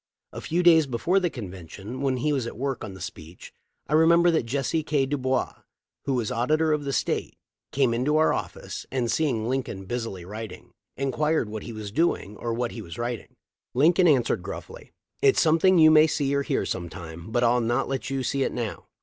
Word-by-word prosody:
A -, -, -6 dB
few 175 Hz, +2 st, 0 dB
days 160 Hz, -4 st, +6 dB
before 150 Hz, +10 st, +1 dB
the 180 Hz, -2 st, 0 dB
convention, 100 Hz, -, -8 dB
when 135 Hz, -2 st, +1 dB
he 150 Hz, +4 st, 0 dB
was 130 Hz, -4 st, -1 dB
at 120 Hz, -, -7 dB
work 135 Hz, 0 st, -3 dB
on 95 Hz, -, -7 dB
the -, -, -11 dB
speech, 85 Hz, -2 st, -9 dB, 0.3 s
I -, -, -3 dB
remember 170 Hz, +2 st, +5 dB
that 160 Hz, -8 st, 0 dB
Jesse 140 Hz, +5 st, 0 dB
K. 150 Hz, -2 st, +1 dB
Dubois,* 130 Hz, -2 st, -1 dB, 0.5 s
who 135 Hz, -, 0 dB
was 120 Hz, -4 st, -1 dB
Auditor 155 Hz, +6 st, +2 dB
of 150 Hz, -, 0 dB
State, -, -, -2 dB, 0.3 s
came 130 Hz, -3 st, +2 dB
into 130 Hz, +6 st, 0 dB
the -, -, +4 dB
office 155 Hz, -, -1 dB
and. 125 Hz, -3 st, 0 dB
seeing 125 Hz, -8 st, 0 dB
Lincoln 125 Hz, -7 st, -3 dB
busily 115 Hz, -5 st, -4 dB
writing, 105 Hz, -1 st, -8 dB, 0.3 s
inquired 140 Hz, -1 st, 0 dB
what 110 Hz, 0 st, -5 dB
he 120 Hz, -, -7 dB
was 110 Hz, -2 st, -7 dB
doing 115 Hz, -, 0 dB
or 115 Hz, -, -3 dB
what 120 Hz, +1 st, -2 dB
he 115 Hz, -, -7 dB
was 85 Hz, -5 st, -9 dB
writing. 120 Hz, 0 st, -4 dB, 0.4 s
Lincoln 175 Hz, +7 st, +5 dB
answered 135 Hz, -7 st, +3 dB
gruffly, -, -, -9 dB, 0.3 s
"It's 410 Hz, -1 st, +4 dB
something 165 Hz, +3 st, +4 dB
you 155 Hz, -1 st, +7 dB
may 155 Hz, 0 st, +7 dB
see 140 Hz, -2 st, 0 dB
or 140 Hz, -, +2 dB
hear -, -, -1 dB
sometime, 85 Hz, +1 st, -6 dB
but 120 Hz, +1 st, +1 dB
I'll 120 Hz, +1 st, +3 dB
not 120 Hz, +3 st, 0 dB
let 130 Hz, -1 st, -3 dB
you 135 Hz, -1 st, -2 dB
see 135 Hz, +3 st, -1 dB
it -, -, +1 dB
now." 115 Hz, -4 st, -5 dB
130 Hz, 200 wpm, -25 LUFS, 115-155 Hz, 0.5 s, you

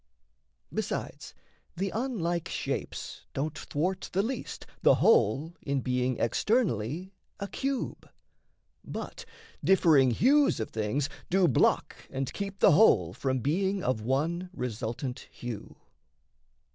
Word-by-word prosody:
Besides, -, -, -4 dB, 0.4 s
the 195 Hz, +1 st, -1 dB
unlike 190 Hz, -9 st, -1 dB
shapes -, -, -4 dB
don't 150 Hz, +3 st, -2 dB
thwart 185 Hz, +6 st, -2 dB
the 195 Hz, +2 st, +2 dB
least 255 Hz, +5 st, -4 dB, 0.2 s
The -, -, +6 dB
whole 145 Hz, -, +3 dB
in 140 Hz, -1 st, -1 dB
being 125 Hz, -1 st, 0 dB
externally 175 Hz, -, 0 dB, 0.3 s
a 200 Hz, -, -3 dB
cube; 270 Hz, +4 st, -3 dB, 0.7 s
But -, -, -7 dB, 0.4 s
differing 160 Hz, -9 st, +5 dB
hues 275 Hz, -, +4 dB
of 110 Hz, -, -3 dB
things 110 Hz, +6 st, -1 dB, 0.2 s
do 185 Hz, 0 st, +4 dB
block 130 Hz, -, +2 dB
and 135 Hz, 0 st, -3 dB
keep 195 Hz, -1 st, -5 dB
The -, -, +7 dB
whole 105 Hz, -, +5 dB
from 130 Hz, +3 st, -1 dB
being 190 Hz, -, 0 dB
of 125 Hz, -4 st, 0 dB
one 160 Hz, +10 st, -1 dB
resultant 125 Hz, -, -4 dB
hue. 120 Hz, -4 st, -7 dB
155 Hz, 115 wpm, -29 LUFS, 125-195 Hz, 0.7 s, The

